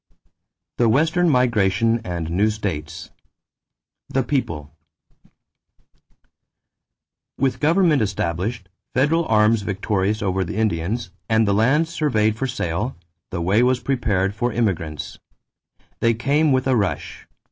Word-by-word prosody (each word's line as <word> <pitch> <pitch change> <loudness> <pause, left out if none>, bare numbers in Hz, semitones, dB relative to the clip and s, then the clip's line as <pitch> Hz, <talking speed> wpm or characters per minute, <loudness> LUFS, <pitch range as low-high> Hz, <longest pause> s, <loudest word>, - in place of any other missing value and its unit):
THE 120 -2 +4
WESTERN 160 +8 +2
MIGRATION 115 -3 +2
AND 85 -4 -4
NEW 100 +5 +2
STATES 85 -6 -5 1.0
=The 135 - 0
People.= 80 - -2 2.7
With 135 -1 0
government 160 -2 +3
established, 100 +1 -2 0.3
federal 155 +6 +2
arms 110 0 +3
victorious 100 +1 -1
over 95 -1 0
the 85 - -6
Indians, 105 0 -1 0.2
and 110 -1 +3
the 100 - +2
lands 140 +10 +2
surveyed 110 -10 +1
for 135 +4 -2
sale, 105 -1 -3 0.3
the 85 - -4
way 100 +6 +3
was 125 0 +2
prepared 110 -7 0
for 120 +4 -1
the 110 - -7
immigrants. 80 -9 -2 0.8
They 115 0 +2
came 145 +6 +2
with 130 -1 +2
a 130 -1 +2
rush. 100 -5 -3
110 Hz, 120 wpm, -21 LUFS, 95-130 Hz, 2.7 s, THE